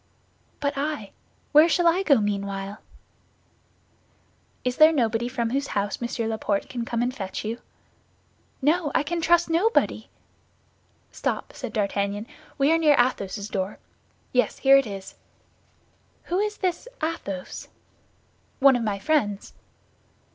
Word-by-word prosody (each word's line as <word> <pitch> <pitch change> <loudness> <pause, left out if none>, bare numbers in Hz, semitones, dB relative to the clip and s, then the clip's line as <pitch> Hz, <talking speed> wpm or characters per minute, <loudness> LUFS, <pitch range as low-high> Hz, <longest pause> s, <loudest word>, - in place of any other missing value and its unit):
"But 285 0 0
I—where 300 - +1
shall 350 0 +3
I 340 +3 +4
go 295 -8 +4
meanwhile?" 200 0 -3 1.8
"Is 250 0 -1
there 310 +1 +8
nobody 235 -5 +1
from 235 -2 -2
whose 275 +2 -1
house 205 +3 -1
Monsieur 235 -1 -2
Laporte 220 -2 -1
can 240 -2 -4
come 235 0 -1
and 250 +1 -2
fetch 195 -1 -5
you?" 230 +2 -4 1.0
"No, 310 +1 +2
I - - +3
can 335 +3 -2
trust 345 +1 +4
nobody." 360 +8 +1 1.0
"Stop," - - -3
said 255 -5 -6
D'Artagnan; 200 0 -1 0.3
"we 280 +2 +3
are 330 - +4
near 300 -3 +5
Athos's 205 -5 0
door. 195 -1 -3 0.6
Yes, 250 -1 +2
here 270 0 +6
it 275 -3 +1
is." 195 -2 -7 1.1
"Who 360 +2 -1
is 420 0 -1
this 365 +4 -2 0.2
Athos?" 200 - -4 0.9
"One 270 -1 +6
of 245 - 0
my 210 -3 -1
friends." 210 -6 0
250 Hz, 130 wpm, -25 LUFS, 205-310 Hz, 1.8 s, there